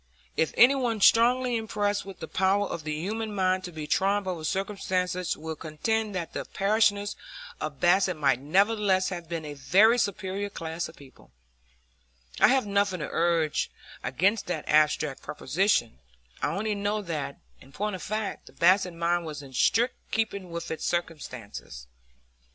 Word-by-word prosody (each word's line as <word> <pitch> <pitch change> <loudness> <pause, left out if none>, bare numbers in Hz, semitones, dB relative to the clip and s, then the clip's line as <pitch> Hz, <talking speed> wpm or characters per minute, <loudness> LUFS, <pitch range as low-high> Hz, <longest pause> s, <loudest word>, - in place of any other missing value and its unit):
If 160 - +1
any 250 +3 +8
one 245 -5 -1
strongly 245 +4 +4
impressed 205 -2 -1
with 195 - -10
the 160 - -5
power 190 +3 +2
of 170 -5 -5
the 155 -1 -2
human 210 +6 -3
mind 185 -1 +1
to 160 -4 -6
triumph 195 +5 +1
over 180 -4 -4
circumstances 185 -1 -1
will 160 +1 -5
contend 205 +8 -2
that 170 -3 -4
the - - -3
parishioners 205 0 +1 0.4
of 145 -3 -5
Basset 180 0 +3
might 135 -4 +2
nevertheless 190 +5 +2
have 175 -3 -6
been 165 -2 -4
a 150 - -6
very 200 - +4
superior 200 -1 -2
class 165 -3 -4
of 160 - -14
people, 140 -2 -17 1.1
I - - +7
have 265 -3 +3
nothing 200 -3 0
to 150 - -3
urge 165 -2 +1 0.3
against 185 - +1
that 160 -4 -3
abstract 150 -2 +2
proposition; 155 - 0 0.4
I - - +1
only 215 +2 -1
know 205 +1 -1
that, 160 -6 -4 0.2
in 135 - -17
point 210 +6 -2
of 185 - -8
fact, 215 0 -4
the - - -14
Basset 180 0 +3
mind 170 +1 +1
was 150 -2 -6
in 135 -1 -12
strict 235 - +3 0.2
keeping 200 -4 -2
with 170 0 -5
its 160 - -4
circumstances. 125 - -4
185 Hz, 160 wpm, -27 LUFS, 160-205 Hz, 1.1 s, any